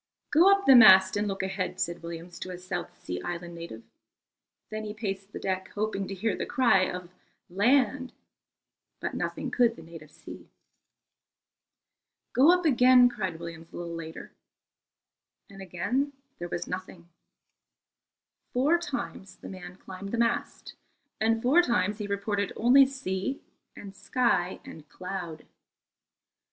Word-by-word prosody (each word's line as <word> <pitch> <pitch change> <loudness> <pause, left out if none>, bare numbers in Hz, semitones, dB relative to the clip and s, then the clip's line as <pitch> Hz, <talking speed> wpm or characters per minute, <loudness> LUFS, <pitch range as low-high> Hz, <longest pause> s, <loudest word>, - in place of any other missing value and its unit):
"Go 345 +6 +6
up 395 0 +2
the 270 - +8
mast 190 -5 +8
and 205 +1 0
look 195 -1 -3
ahead," 190 -1 -3
said 175 -2 -2
Williams 170 +1 -8
to - - -6
a 180 - -6
South 175 - -6
Sea 90 0 -5
Island 175 0 -6
native. 165 -10 -9 0.9
Then 215 0 -4
he 210 0 -6
paced 195 -2 -5
the - - -7
deck, 190 -1 -3
hoping 205 -2 -2
to 195 - -6
hear 205 +1 -1
the - - -4
cry 240 -8 +3
of 180 -1 -8 0.4
"Land," 255 +6 +2 0.9
but - - -4
nothing - - -4
could 235 -2 +2
the 165 - -12
native 160 -2 -12
see. - - -12 1.8
"Go 275 +7 +6
up 360 -1 +2
again," 250 -3 +6
cried 190 -8 -4
Williams 165 -1 -9
a - - -9
little 170 -1 -6
later. 160 -1 -8 1.2
And 195 0 -11
again 235 - -2 0.3
there 175 0 -5
was 175 - -3
nothing. 180 -2 -7 1.5
Four 290 +7 +3
times 240 - -6
the - - -11
man 180 -1 -9
climbed 190 +1 -9
the 235 - -2
mast, 230 0 -1 0.5
and 225 +1 +1
four 285 +8 +5
times 230 - 0
he 210 - -4
reported 200 0 -2
only 260 +4 +6
sea 265 -2 -4 0.4
and 195 -1 -10
sky 200 -3 0
and 155 -2 -12
cloud. 180 -3 -7
195 Hz, 145 wpm, -28 LUFS, 175-240 Hz, 1.8 s, the